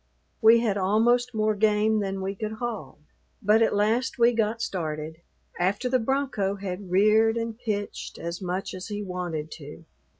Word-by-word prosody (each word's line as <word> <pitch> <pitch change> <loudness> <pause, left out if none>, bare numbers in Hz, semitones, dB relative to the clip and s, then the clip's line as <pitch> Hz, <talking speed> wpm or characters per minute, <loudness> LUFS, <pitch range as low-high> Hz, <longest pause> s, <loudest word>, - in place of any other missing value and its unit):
We 230 +1 +7
had 205 -4 0
almost 235 +5 +2
more 215 0 +2
game 215 +1 +2
than 195 -1 -3
we 195 +1 -2
could 215 +2 -4
haul, 230 -1 -5 0.4
but 215 0 +3
at 225 - +3
last 225 +6 +1
we 235 0 +5
got 225 -1 0
started, 160 -6 -4 0.4
after 200 +8 0
the 255 0 +2
bronco 235 -6 -1
had 195 -1 -6
reared 215 +4 +4
and 230 -1 -3
pitched 215 -3 -4
as 170 +2 -5
much 185 +1 -3
as 185 0 -7
he 210 -1 -4
wanted 175 -5 -4
to. 150 +2 -11
210 Hz, 165 wpm, -26 LUFS, 190-225 Hz, 0.4 s, We